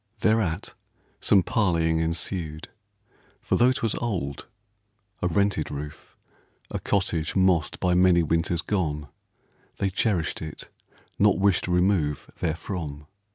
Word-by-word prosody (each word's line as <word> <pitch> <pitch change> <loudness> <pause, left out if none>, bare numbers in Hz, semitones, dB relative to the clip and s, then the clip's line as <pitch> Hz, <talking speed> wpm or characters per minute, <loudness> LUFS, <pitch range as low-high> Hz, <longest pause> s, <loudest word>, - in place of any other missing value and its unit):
Thereat 110 -7 +1 0.5
some 95 -3 +4
parleying 85 -7 +1
Ensued, 80 -1 -2 0.7
for - - -1
tho' 125 +1 +5
'twas 115 -4 -1
old 90 - -3 0.3
— 105 -1 -44
a 90 - +2
rented 95 -3 +1
roof, 75 +1 -8 0.5
A - - -2
cottage 85 -5 -1
mossed 95 -5 +2
by 90 -1 +2
many 90 -1 +5
winters 85 +2 0
gone 75 -8 -2 0.3
— - - -37
They 95 - 0
cherished 95 -5 0
it, 80 -1 -7 0.5
not 100 -1 +5
wished 95 -2 +2
remove 90 -5 +1
therefrom. 80 -3 -4
90 Hz, 120 wpm, -26 LUFS, 80-100 Hz, 0.7 s, tho